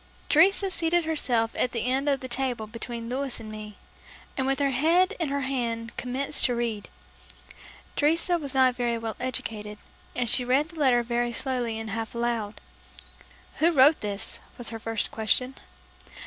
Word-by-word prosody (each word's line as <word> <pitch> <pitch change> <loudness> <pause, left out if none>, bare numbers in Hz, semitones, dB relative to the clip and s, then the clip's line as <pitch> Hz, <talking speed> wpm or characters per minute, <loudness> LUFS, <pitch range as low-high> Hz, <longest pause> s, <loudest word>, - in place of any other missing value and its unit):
Teresa 380 +6 +4
seated 340 -1 +1
herself 245 -8 +1
at 250 - 0
the 230 -1 -1
end 265 +3 +1
of 275 -2 +1
the 260 - -5
table 245 -3 -2
between 230 +1 -6
Louis 260 +1 -3
and 215 -1 -8
me, 210 -1 -8 0.6
and 265 -1 -1
with 270 0 +1
her 280 -1 +1
head 330 +8 +3
in 330 -4 0
her 280 0 -1
hand 235 -3 -2
commenced 255 +3 0
to 245 - +1
read 230 -3 -3 1.1
Teresa 335 +4 +2
was 280 -3 -2
not 260 -1 +5
very 240 -1 -1
well 225 -1 -4
educated 210 -4 -3 0.4
and 245 -1 0
she 250 - +5
read 270 +5 +2
the 335 -2 -10
letter 250 -4 +4
very 240 0 -1
slowly 240 -2 -2
and 220 -1 -5
half 225 +2 -4
aloud. 235 -3 -2 1.0
"Who 320 +4 +4
wrote 295 -1 +5
this?" 205 -1 -3 0.2
was 245 - -3
her 225 0 -6
first 225 0 -2
question. 250 +4 +1
250 Hz, 170 wpm, -27 LUFS, 230-280 Hz, 1.1 s, not